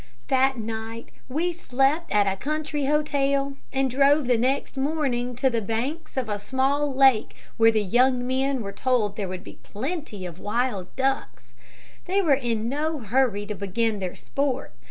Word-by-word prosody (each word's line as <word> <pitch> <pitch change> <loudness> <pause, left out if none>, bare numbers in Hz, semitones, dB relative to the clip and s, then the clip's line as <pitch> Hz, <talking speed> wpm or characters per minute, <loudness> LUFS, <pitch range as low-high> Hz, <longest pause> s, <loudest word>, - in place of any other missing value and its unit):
"That 265 0 +3
night 225 +1 -5 0.2
we 335 +7 0
slept 295 +1 0
at 205 -1 +4
a 195 -1 +1
country 295 +4 -2
hotel, 280 -1 +1
and 270 0 +1
drove 280 +3 +4
the 245 0 +3
next 260 +6 0
morning 265 -4 -1
to 265 +3 +2
the 235 -3 +1
banks 245 +10 -3
of 255 -3 0
a 205 -1 -2
small 275 +6 0
lake 265 -4 +4 0.2
where 225 0 +6
the 215 -1 +1
young 245 +5 +3
men 260 0 0
were 200 - -5
told 215 -2 0
there 205 -3 -3
would 185 0 -6
be - - -12
plenty 255 - -5
of 175 -1 -8
wild 210 -4 -1
ducks. 265 - -2 0.5
They 380 +2 +1
were 330 -7 +4
in 235 -4 0
no 305 +5 -1
hurry 230 -3 +1
to 210 - -4
begin 205 +2 -1
their 185 -2 -4
sport. 275 - -2
255 Hz, 170 wpm, -25 LUFS, 220-280 Hz, 0.5 s, where